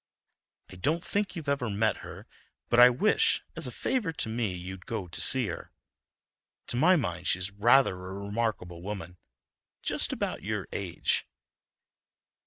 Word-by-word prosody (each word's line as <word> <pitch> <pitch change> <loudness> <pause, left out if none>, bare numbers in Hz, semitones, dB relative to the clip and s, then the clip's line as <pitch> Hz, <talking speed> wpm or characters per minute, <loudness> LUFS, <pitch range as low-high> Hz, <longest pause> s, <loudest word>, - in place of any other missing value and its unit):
I 95 - -10
don't 160 - 0
think 205 0 -1
you've 160 -4 -7
ever 140 -4 0
met 105 +1 +1
her, - - -10 0.4
but 120 - +4
I 125 0 +10
wish, 135 - +2
as - - -1
a - - -5
favor 230 -11 -1
to 150 - -2
me, 110 -3 -1
you'd 90 +1 -8
go 110 -5 -4
to 85 - -1
see 130 -2 +7
her. 85 -4 -6 1.0
To - - 0
my 175 +9 +5
mind, 90 - -2
she's 95 +1 +1
rather 120 +5 +4
a 90 +1 -8
remarkable 100 -4 -3
woman, 100 -1 -5
and 90 - -20 0.7
just - - 0
about - - -3
your 105 +2 -3
age." 95 -4 -2
105 Hz, 160 wpm, -28 LUFS, 90-130 Hz, 1.0 s, I